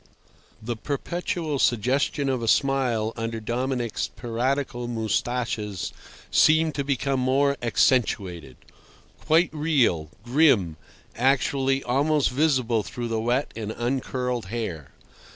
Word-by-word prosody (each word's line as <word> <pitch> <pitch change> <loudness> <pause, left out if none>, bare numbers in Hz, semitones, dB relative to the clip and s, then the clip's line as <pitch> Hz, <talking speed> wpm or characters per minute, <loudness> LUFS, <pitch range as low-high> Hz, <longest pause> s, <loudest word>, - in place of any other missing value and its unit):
The 120 +1 -3
perpetual 155 +3 -3
suggestion 130 +5 +1
of 130 -3 0
a 115 - -3
smile 125 -5 +1
under 115 0 -3
Dominic's 120 +1 -2
piratical 120 +1 -2
moustaches 110 -3 -2 0.4
seemed 160 0 +4
to 140 0 -2
become 135 -1 0
more 140 +2 +2
accentuated—quite 115 - -1
real, 135 - +1 0.2
grim, 120 - +3 0.4
actually 135 +1 +1
almost 145 +3 +1
visible 130 -5 +2
through 120 +3 -5
the 110 -1 -1
wet 125 +5 0
and 110 -1 -4
uncurled 125 -2 -2
hair. 95 - -4
125 Hz, 100 wpm, -25 LUFS, 115-140 Hz, 0.4 s, seemed